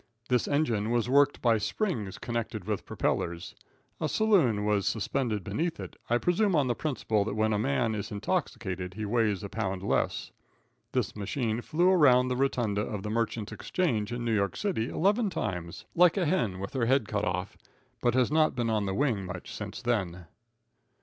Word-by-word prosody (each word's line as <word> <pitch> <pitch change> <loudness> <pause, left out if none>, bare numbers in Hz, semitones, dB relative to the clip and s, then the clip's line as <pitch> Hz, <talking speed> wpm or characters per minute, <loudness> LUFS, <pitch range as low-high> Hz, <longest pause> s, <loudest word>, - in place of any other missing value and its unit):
This 125 -2 +2
engine 120 -8 +1
was 120 -1 +1
worked 140 0 +4
by 115 -3 +4
springs 110 - -2
connected 115 -4 -4
with 105 -1 -3
propellers. 85 0 -2 0.5
A - - -1
saloon 155 - +3
was 105 -2 +1
suspended 110 -2 -1
beneath 165 - -2
it, - - -7
I 120 - +4
presume 180 - +2
on 145 -3 +3
the 125 - +1
principle 115 -7 0
that 105 - -3
when 110 0 +2
a 105 - +1
man 105 +5 +1
is 105 +1 -4
intoxicated 100 - -3
he 110 0 -3
weighs 105 -2 +1
a - - -3
pound 95 -4 -3
less. - - 0 0.6
This - - -1
machine 110 +2 -2
flew 175 +8 +2
around 130 -8 +5
the 125 - 0
rotunda 120 -6 0
of 105 -2 -4
the 105 - -3
Merchants' 115 -1 -1
Exchange, 115 - -1
in 120 0 -3
New 115 - +1
York 100 -2 0
City, 170 - -1
eleven 205 +4 +2
times, 95 - -4
like 175 +2 +5
a 185 - +2
hen 135 - 0
with 100 - -5
her 125 -4 0
head 130 -4 +3
cut 105 -1 -1
off, 90 -1 -2 0.5
but 120 -1 +2
has 130 +1 +3
not 155 -2 +3
been 120 -2 0
on 105 -2 0
the 95 - -1
wing 120 -7 +1
much 90 -1 -7
since - - -6
then. 90 -7 -1
115 Hz, 185 wpm, -29 LUFS, 105-140 Hz, 0.6 s, around